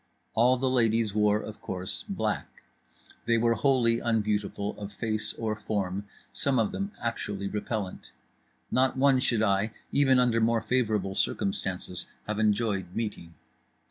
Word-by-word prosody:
All 125 +3 +4
the 130 +1 0
ladies 115 -4 +2
wore, 105 0 +3
of 110 - -9
course, 90 0 -4
black; - - -3 0.6
they 115 0 +4
were 115 +1 +3
wholly 120 -3 +3
unbeautiful 105 -3 -1
of 100 -1 -6
face 110 0 -2
or 110 -2 -2
form, 100 -2 -2 0.3
some 140 -2 +1
of 110 -2 +2
them 195 +1 -3
actually 105 -4 -3
repellant; 105 -1 -4 0.6
not 130 +1 +2
one 135 -1 +5
should 115 -3 +2
I, 100 +1 +1 0.2
even 135 -2 +4
under 120 -2 +3
more 115 0 +2
favourable 110 -5 +1
circumstances, 95 -2 -2 0.2
have 105 0 -2
enjoyed 105 -4 +1
meeting. 100 -7 -4
110 Hz, 140 wpm, -28 LUFS, 100-120 Hz, 0.6 s, one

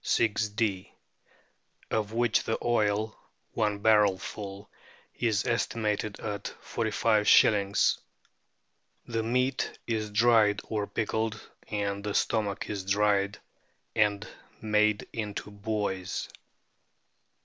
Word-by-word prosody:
of 105 -1 0
which 120 0 +2
the 110 - 0
oil 110 -2 +1 0.4
(one 105 -2 0
barrel 105 -2 +4
full) 100 0 -7 0.5
is 110 -3 0
estimated 110 -3 -1
at 105 -3 -4 0.2
45^. 105 -2 +3 1.1
The 115 -1 -2
meat 125 +3 0
is 110 -2 -2
dried 105 -1 +4
or 105 -2 -3
pickled, 110 0 -2 0.3
and 100 -1 -2
the 105 -1 -3
stomach 105 -3 0
is 100 -2 -4
dried 100 0 +2 0.6
and 105 -2 +2 0.3
made 105 -1 +2
into 105 -2 -4
buoys. 100 -2 -3
105 Hz, 90 wpm, -28 LUFS, 100-110 Hz, 1.1 s, barrel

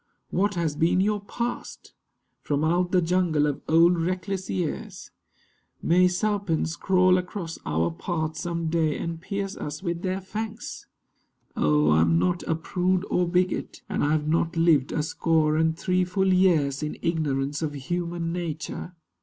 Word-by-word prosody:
What 200 +2 +1
has 165 -4 -1
been 165 +4 +2
your 210 +2 +2
past? 235 +4 -5 0.5
From 145 0 -1
out 175 +2 +1
the 180 -2 +3
jungle 165 -3 +2
of 145 -1 -2
old 170 +2 +5
reckless 185 +2 -2
years, 175 -5 -4 0.7
May 180 +2 +4
serpents 180 -3 0
crawl 185 -1 +3
across 180 -2 -6
our 80 +3 +1
path 160 - -3
some 170 -2 -3
day 160 -2 +1
And 165 -1 -4
pierce 200 +1 -3
us 150 +3 -6
with 170 -2 -2
their 185 0 -1
fangs? 215 +3 -6 0.7
Oh, 75 0 +3
I 80 +1 +5
am 80 0 +3
not 175 - +1
A 160 - +1
prude 180 +3 0
or 180 -1 +2
bigot; 180 +1 -1
and - - -1
I 145 +1 +2
have 150 -1 0
not 165 +1 0
lived 160 -5 +3
A 150 - 0
score 155 -1 +1
and 160 0 +1
three 185 +1 +1
full 190 +1 +1
years 160 -7 +3
in 150 0 -4
ignorance 145 -3 -1
Of 150 -2 -2
human 170 +3 -3
nature. 170 +1 -5
170 Hz, 160 wpm, -26 LUFS, 155-185 Hz, 0.7 s, old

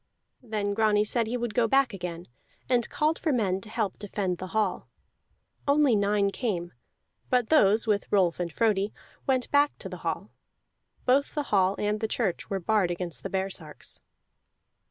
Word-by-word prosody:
Then 210 -4 -2
Grani 210 -1 +3
said 230 +1 +1
he 245 +2 -1
would 240 -2 -3
go 235 -2 +3
back 270 -1 +3
again, 175 -2 -6 0.4
and 245 -2 +2
called 310 +1 +1
for 315 - 0
men 195 -7 +1
to 215 - -11
help 215 -4 -2
defend 195 -3 -2
the 185 - -5
hall. 210 -1 -1 0.8
Only 280 -4 +4
nine 200 -1 +2
came. 180 -8 -3 0.6
But 245 -3 +2
those, 220 -8 +5
with 210 -3 0
Rolf 185 -5 +3
and 175 -1 -2
Frodi, 205 +2 +1 0.3
went 260 -2 +1
back 290 0 +3
to - - -7
the - - -7
hall; - - -4 0.7
both 270 +3 +2
the 295 - 0
hall 190 0 +4
and 210 +1 0
the 220 - -1
church 215 -5 -1
were 195 -2 -1
barred 195 0 +2
against 175 -6 -4
the - - -5
baresarks. 190 -5 -4
210 Hz, 170 wpm, -27 LUFS, 190-240 Hz, 0.8 s, those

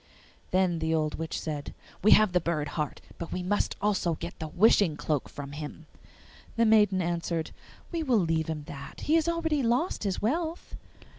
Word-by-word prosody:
Then 185 -2 +2
the 160 0 +1
old 155 -1 -1
witch 160 -1 -3
said, 150 -2 -5 0.3
'We 215 - +5
have 215 -3 +5
the 180 - +3
bird 155 -3 -1
heart, 150 -2 -3 0.2
but 170 - -6
we 180 - -3
must 205 +3 0
also 195 -5 +1
get 170 +3 -7
the 160 - -4
wishing 180 -2 +4
cloak 150 -3 -1
from 140 -1 -7
him.' 150 +2 -7 0.7
The 230 - +3
maiden 210 -4 +4
answered, 170 -1 -2 0.4
'We 335 -2 -1
will 260 -7 +2
leave 165 -4 +1
him 155 -2 -3
that; 140 0 -9
he 305 - 0
has 325 0 +3
already 325 -3 0
lost 245 +8 0
his 195 -3 -1
wealth! 320 +9 -2
175 Hz, 180 wpm, -28 LUFS, 160-220 Hz, 0.7 s, We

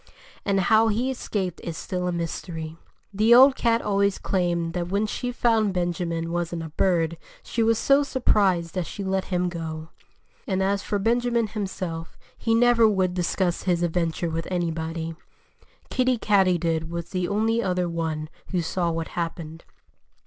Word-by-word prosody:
And 195 -1 +2
how 220 +5 +4
he 235 +5 0
escaped 195 -8 -3
is 165 -2 -5
still 180 -1 -3
a - - 0
mystery. 165 -1 -4 0.4
The 220 +4 +5
old 265 +2 +8
cat 230 0 +1
always 200 -1 +1
claimed 175 -3 -1
that 175 -1 -2
when 200 +4 0
she 245 +3 -3
found 225 -5 +2
Benjamin 170 -2 -2
wasn't 170 -1 -2
a 160 - -6
bird 170 0 +1 0.3
she 235 - -2
was 225 0 +3
so 275 +5 +4
surprised 195 - +1
that 180 -4 -2
she 200 - -6
let 190 0 -1
him 180 -1 0
go. 160 -2 -5 0.6
And 190 0 0
as 200 +1 +1
for 205 - -2
Benjamin 235 +2 +1
himself, 185 -6 -5 0.2
he 225 -1 0
never 235 -1 +5
would 190 -4 +1
discuss 180 0 0
his 175 -1 +2
adventure 170 0 -1
with 165 +1 -3
anybody. 165 -2 -2 0.8
Kiddie 255 -1 +2
Katydid 175 -6 +2
was 170 0 -5
the 180 -2 -1
only 225 +3 +1
other 180 -3 0
one 160 -2 -3 0.2
who 180 -3 -1
saw 170 +1 -1
what 165 -1 -3
happened. 165 -1 -5
180 Hz, 160 wpm, -25 LUFS, 170-210 Hz, 0.8 s, old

